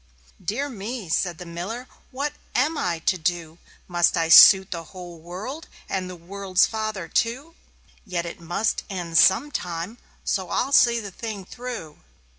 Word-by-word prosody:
"Dear 230 +11 -2
me!" 225 - -6
said 175 +1 0
the 180 - -9
Miller, 190 +9 -6 0.2
"what 285 +3 -3 0.2
am 295 +6 +2
I 175 - -1
to 185 - +2
do? 170 -1 -2 0.3
Must 175 -1 +2
I 165 -1 +1
suit 190 +3 +9
the 170 -2 -5
whole 175 -2 -10
world 195 - -7 0.2
and 185 -2 -3
the 180 - -7
world's 185 +2 +1
father, 215 -5 -4
too? 260 +8 -1 0.5
Yet 180 -5 -3
it 170 - -8
must 175 +6 -1
end 175 -4 0
some 240 +10 +5
time 180 +5 -5 0.2
so 190 -3 -1
I'll 270 - 0
see 235 -3 +5
the 205 -3 -7
thing 210 -1 -6
through." 235 -10 -7
190 Hz, 160 wpm, -24 LUFS, 175-230 Hz, 0.5 s, suit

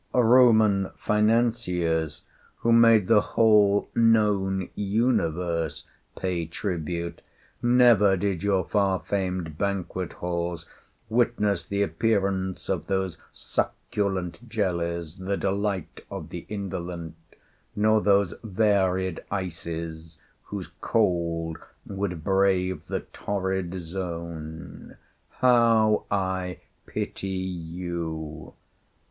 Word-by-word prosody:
Roman 110 -5 +5
financiers, 105 -8 +1 0.3
who 115 - +1
made 115 -3 +6
the 105 +1 +5
whole 105 -3 +4
known 105 -5 +2
universe 90 - 0 0.3
pay 90 -3 -2
tribute, 85 -1 -4 0.4
never 120 -5 +5
did 95 -2 -1
your 100 -2 +2
far 100 -3 +1
famed 90 -5 -3
banquet 95 -2 -2
halls 85 -1 -3 0.4
witness 110 -5 +1
the 100 0 0
appearance 95 0 0
of - - -2
those 95 -4 -1
succulent 100 +2 -3
jellies, 85 -6 -2
the 95 +1 -2
delight 100 -2 -2
of - - -7
the - - -8
indolent, 90 -5 -5 0.6
nor 110 +1 +3
those 100 -2 +3
varied 95 -4 +1
ices 85 -3 -5 0.3
whose - - -6
cold 85 -6 0 0.3
would 95 -5 -4
brave 95 -1 +1
the - - -2
torrid 95 -2 -3
zone. 85 -2 -7 0.3
How 115 -4 +4
I 95 -2 -1 0.3
pity 95 - -4
you! 85 -4 -5
95 Hz, 90 wpm, -26 LUFS, 85-105 Hz, 0.6 s, made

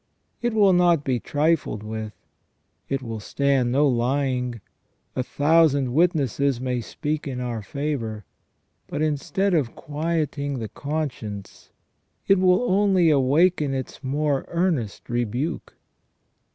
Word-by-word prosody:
It 240 -1 -1
will 200 -3 +5
not 175 -4 +4
be 130 -3 0
trifled 145 -6 0
with; 110 -1 -5 0.7
it 135 -1 -1
will 115 -2 -5
stand 135 +2 +1
no 145 +3 +4
lying; 125 -1 0 0.6
a - - 0
thousand 145 -2 +3
witnesses 140 - +2
may 125 -1 -2
speak 150 +6 -4
in 130 -2 -4
our 120 -3 -3
favour, 115 -5 -4 0.6
but 150 - -2
instead 155 +6 0
of 140 -8 0
quiet 155 0 -2
ing 140 -1 -2
the 110 -3 -5
conscience 125 -10 -5 0.6
it 195 -1 +5
will 185 +4 +4
only 190 -6 +3
awaken 145 +1 +3
its 130 +2 -6
more 140 +1 0
earnest 170 - -1
rebuke. 120 +7 -2
140 Hz, 125 wpm, -24 LUFS, 125-160 Hz, 0.7 s, will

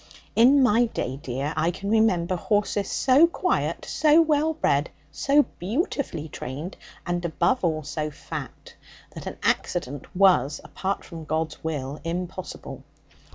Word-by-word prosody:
'In 265 +4 +6
my 240 0 +4
day, 135 - -3
dear, 135 +4 -3
I 155 +2 +2
can 195 +3 -4
remember 185 -6 +3
horses 205 +1 0
so 275 +6 +5
quiet, 365 +2 -1
so 310 +1 +4
well 315 0 +2
bred, 140 - +1 0.2
so 290 +1 +3 0.2
beautifully 210 - -2
trained, 150 +5 -6 0.3
and, 175 0 -2
above 190 +9 +1
all, 155 -3 0
so 155 +1 -3
fat, 150 - -8 0.4
that - - -8
an - - -6
accident 135 +2 -1
was, 180 -8 +4
apart 195 +1 -3
from 165 -3 -9
God's 160 0 -2
will, 145 -3 -4
impossible. 175 +2 -5
180 Hz, 135 wpm, -25 LUFS, 155-245 Hz, 0.4 s, In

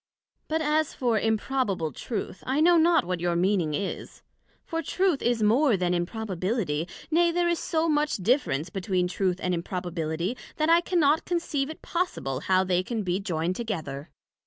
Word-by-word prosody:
But 320 0 0
as 305 0 +1
for 235 -4 +1
Improbable 220 - 0
Truth 200 - -5
I 265 +3 +1
know 345 +3 +6
not 335 - +4
what 180 0 -2
your 175 0 0
meaning 175 -4 +1
is; 195 +5 -5 0.4
for 330 0 -2
Truth 360 0 +1
is 235 -2 +1
more 235 +2 +4
then 180 -1 0
Improbability: 180 -3 -2 0.2
nay, 340 +1 +4
there 350 +1 +1
is 340 -1 +1
so 325 0 0
much 300 -1 +1
difference 185 - 0
between 185 -1 0
Truth 180 0 -1
and 180 - 0
Improbability, 175 +2 -3 0.2
that 310 +1 +2
I 340 +1 +6
cannot 320 -4 +2
conceive 320 -5 -1
it 315 - -9
possible 135 - -2
how 185 +5 +2
they 180 -1 +1
can 220 +3 -3
be 180 0 0
joined 175 -3 -2
together. 160 -11 -4
210 Hz, 165 wpm, -27 LUFS, -, 0.4 s, know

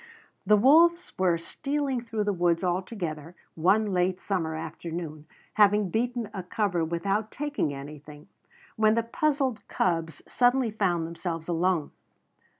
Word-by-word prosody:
The 210 - +6
wolves 330 +9 +5
were 180 -3 +3
stealing 275 - -2
through 225 -2 -3
the 205 0 0
woods 175 -1 +1
all 180 0 +1
together, 170 -5 -6 0.2
one 200 +5 +2
late 180 +1 +1
summer 170 -6 -2
afternoon, 160 -1 -6 0.3
having 205 -2 +4
beaten 240 +1 -1
a 195 - -4
cover 180 -2 -1
without 195 +6 -1
taking 290 - -2
anything, 145 +2 -10 0.5
when 215 0 +4
the 230 - +1
puzzled 265 -2 0
cubs 165 -3 -1
suddenly 245 -1 +2
found 180 -6 0
themselves 165 -1 -5
alone. 175 -2 0
190 Hz, 135 wpm, -27 LUFS, 165-225 Hz, 0.5 s, The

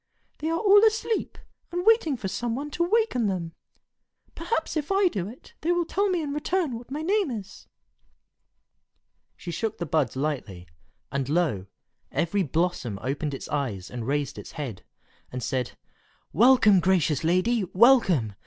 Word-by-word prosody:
"They 315 - -2
are 330 - 0
all 410 +2 +6
asleep, 445 0 +1 0.3
and 355 +1 -3
waiting 440 - +4
for 210 - -4
some 230 +4 -2
one 290 +3 -5
to 345 - 0
waken 365 - +1
them. 175 -4 -3 0.8
Perhaps 330 -1 -2
if 305 +3 -2
I 390 -1 +4
do 190 - -3
it, 235 +5 -13
they 335 - +1
will 350 -1 +1
tell 400 +4 0
me 355 -3 0
in 285 -1 -3
return 305 -2 -1
what 235 +2 -10
my 295 +3 -4
name 395 0 +1
is." 210 -5 -8 1.7
She 175 - -7
shook 215 +6 -3
the 170 - -3
buds 150 -6 0
lightly, 130 -11 -3 0.4
and 135 -1 -2
lo! 150 - 0 0.4
every 170 +7 0
blossom 160 - -1
opened 140 +2 -2
its - - -8
eyes 120 -11 -3
and 120 -2 -5
raised 140 0 -1
its - - -10
head, 130 - -6 0.5
and 125 -1 -5
said, 130 -3 -2 0.6
"Welcome, 225 -4 +6
gracious 175 -5 +1
lady! 185 +7 +2
welcome! 185 - +4
200 Hz, 160 wpm, -26 LUFS, -, 1.7 s, all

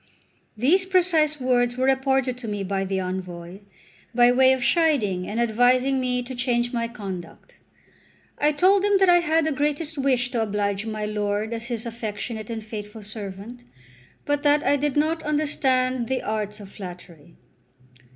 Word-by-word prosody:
These 330 - +3
precise 335 -5 +2
words 245 -1 +1
were 260 - +1
reported 265 -1 +1
to 240 - -7
me 205 -2 -3
by 195 0 -2
the 190 0 -1
envoy, 180 -1 -6 0.6
by 245 0 +6
way 260 +1 +5
of 260 -1 0
chiding 245 - +1
and 220 - -3
advising 250 +3 +3
me 250 -1 -1
to 255 +2 -8
change 240 -1 0
my 230 -1 -1
conduct. 195 -7 -9 0.8
I 295 +1 +3
told 375 +6 +3
him 410 -1 +4
that 385 -1 +4
I 350 0 +7
had 325 -2 +1
the 315 - 0
greatest 295 +1 -2
wish 255 -2 +1
to 235 - 0
oblige 205 -1 -1
my 215 -1 -3
lord 210 +1 -2
as 230 0 -4
his 235 -2 -3
affectionate 220 -1 -5
and 225 -1 -5
faithful 210 0 -8
servant, 210 +3 -7 0.6
but 290 0 0
that 295 0 +3
I 285 - +4
did 290 0 -1
not 315 +2 +1
understand 260 -5 0
the 265 0 -2
arts 210 -1 -3
of 200 -2 -11
flattery. 175 -4 -11
245 Hz, 165 wpm, -24 LUFS, 210-285 Hz, 0.8 s, I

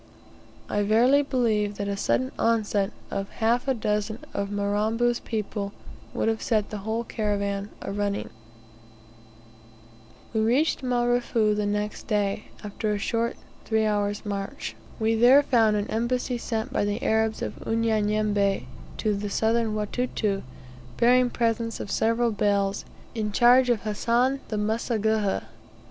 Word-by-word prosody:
I 205 - 0
verily 235 +7 +4
believe 220 -7 0
that 200 0 -3
a 200 - -1
sudden 255 +6 0
onset 215 -3 +1 0.2
of 195 0 -3
half 235 +3 +1
a 265 - +2
dozen 210 0 -1 0.2
of 200 0 -2
Mirambo's 215 +4 0
people 210 -2 -4 0.4
would - - -1
have 225 0 0
set 215 -3 0
the 210 - -4
whole 220 +3 -2
caravan 200 -2 -2
arunning. 200 0 -2 2.0
We 220 - +1
reached 255 +10 +2
Marefu 240 -3 +1
the 210 0 -1
next 210 0 -3
day, 205 -1 0 0.2
after 210 +1 -3
a 210 - 0
short 230 +3 -1 0.3
three 220 -1 +1
hours' 205 -1 -1
march. 200 +6 -4 0.2
We 220 0 +2
there 245 +5 +6
found 225 -6 +3
an 205 0 -1
embassy 245 +2 -1
sent 230 +3 -3
by - - +1
the 205 +1 -2
Arabs 220 0 +1
of - - -4
Unyanyembe, 215 -3 +1 0.3
to 215 -2 0
the 205 0 -3
Southern 225 +1 +1
Watuta, 210 -2 -1 0.6
bearing 250 +1 +4
presents 230 -1 -1
of 200 - -5
several 230 +1 +2
bales, 200 -1 0 0.3
in 215 -2 -2
charge 245 +4 +5
of 235 -3 +2
Hassan 235 +5 +1
the 215 - -3
Mseguhha. 220 - 0
220 Hz, 135 wpm, -26 LUFS, 205-235 Hz, 2.0 s, there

